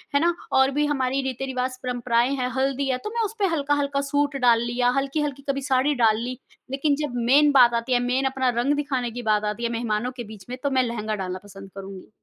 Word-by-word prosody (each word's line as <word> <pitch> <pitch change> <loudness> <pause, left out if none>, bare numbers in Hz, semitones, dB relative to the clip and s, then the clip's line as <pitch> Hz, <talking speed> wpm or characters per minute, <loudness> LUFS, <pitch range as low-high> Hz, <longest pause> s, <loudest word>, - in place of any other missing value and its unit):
है - - +5
ना 345 +1 +3 0.2
और 265 +1 +4
भी 295 +2 +1
हमारी 270 -2 0
रीति-रिवाज़, 260 0 -3
परम्पराएँ 245 0 +1
हैं, 250 -2 -1
हल्दी 270 +1 0
है 255 - +1
तो - - -2
मैं 470 - +1
उसपे 425 -1 -2
हल्का-हल्का 285 -1 0
सूट 285 -1 +1
डाल 230 -1 +5
लिया, 240 +1 +1
हल्की-हल्की 275 0 -2
कभी 275 0 0
साड़ी 265 +3 +3
डाल 215 -1 +5
ली। 250 +1 -4 0.3
लेकिन 280 +2 +1
जब 275 -5 -4 0.2
मेन 295 +1 +6
बात 250 -4 +6
आती 250 +2 -2
है, 245 - +4
मेन 250 +2 0
अपना 265 -1 +1
रंग 280 +4 +2
दिखाने 265 -5 -2
की 245 +2 -6
बात 210 0 +2
आती 235 +3 -8
है, 235 - +1
मेहमानों 230 +1 -1
के 240 - -4
बीच 195 -3 -13
में 250 - -5
तो 285 - +1
मैं 260 -1 +3
लहंगा 220 -3 -3
डालना 185 -2 -4
पसंद 195 -1 -12
करुँगी। 195 -1 -9
255 Hz, 225 wpm, -24 LUFS, 235-280 Hz, 0.3 s, मेन